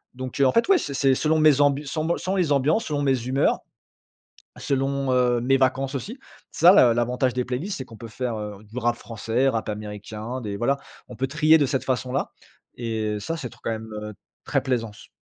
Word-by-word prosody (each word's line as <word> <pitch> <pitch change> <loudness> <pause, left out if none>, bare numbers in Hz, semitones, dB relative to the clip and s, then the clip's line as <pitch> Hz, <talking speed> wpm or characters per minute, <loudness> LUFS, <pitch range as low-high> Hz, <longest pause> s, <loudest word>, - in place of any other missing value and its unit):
Donc, 130 +1 -6
heu, 140 - +5
en - - +3
fait 230 - +3
ouais 390 - +6
c'est 140 - -4
c'est 135 0 +3
selon 155 +3 +1
mes 155 -3 +5
ambu 145 +1 +2
sans 155 +3 -3
mon 170 - +1
selon 190 +1 -2
mes 170 -5 +1
ambiances, 150 - +2
selon 145 -2 -2
mes 135 -2 +2
humeurs. 135 +2 +2 1.0
Selon, 135 -1 -1
heu, 125 -1 +3
mes 135 +2 +3
vacances 130 +1 +1
aussi. 210 - -5 0.3
Ça 175 +3 +7
l'a 125 - +6
l'avantage 125 +2 0
des 125 -1 -1
playlists, 135 +12 -3
c'est 130 - -5
qu'on 115 - -13
peut 115 - -8
faire, 120 0 -3
heu, 105 -1 -7
du 110 +4 -8
rap 120 -1 +1
français, 115 +4 -1
rap 115 -3 -3
américain, 105 +3 -6
des 105 -2 -4
voilà, 135 +6 +1 0.3
on 125 - -9
peut 130 +4 -1
trier 155 +3 +5
de 145 - +2
cette 135 0 -1
façon-là. 130 0 -2 0.5
Et 110 -3 -2
ça, 165 +11 -3
c'est 125 -7 -6
trop, - - -18
quand - - -1
même, 110 0 -6
heu, 105 0 -7 0.3
très 135 - 0
plaisance. 115 -5 -3
130 Hz, 215 wpm, -24 LUFS, 115-140 Hz, 1.0 s, Ça